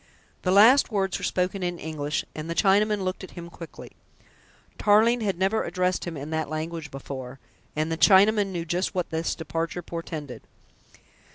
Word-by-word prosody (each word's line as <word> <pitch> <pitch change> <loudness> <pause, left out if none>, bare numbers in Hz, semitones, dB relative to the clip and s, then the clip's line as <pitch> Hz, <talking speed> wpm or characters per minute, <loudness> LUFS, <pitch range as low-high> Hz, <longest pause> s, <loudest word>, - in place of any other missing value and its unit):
The 185 - -1
last 230 +8 +6
words 195 -3 0
were - - -9
spoken 185 +2 -1
in 175 -1 -2
English, 150 -2 -3
and 155 +1 -6
the 170 - -2
Chinaman 205 +1 +3
looked 185 +1 -3
at 190 - -11
him 170 0 -8
quickly. 165 -1 -10 0.9
Tarling 225 +3 +4
had 195 -5 -1
never 195 +4 +1
addressed 185 0 -1
him 170 -3 -5
in 145 +3 -6
that 160 -1 -2
language 155 0 -4
before, 135 -1 -7 0.4
and 155 +2 -1
the 165 - -1
Chinaman 205 +1 +6
knew 175 -3 -4
just 180 +4 -1
what 180 -2 -2
this 160 +1 -1
departure 165 +2 -4
portended. 160 -5 -6
175 Hz, 170 wpm, -26 LUFS, 160-195 Hz, 0.9 s, last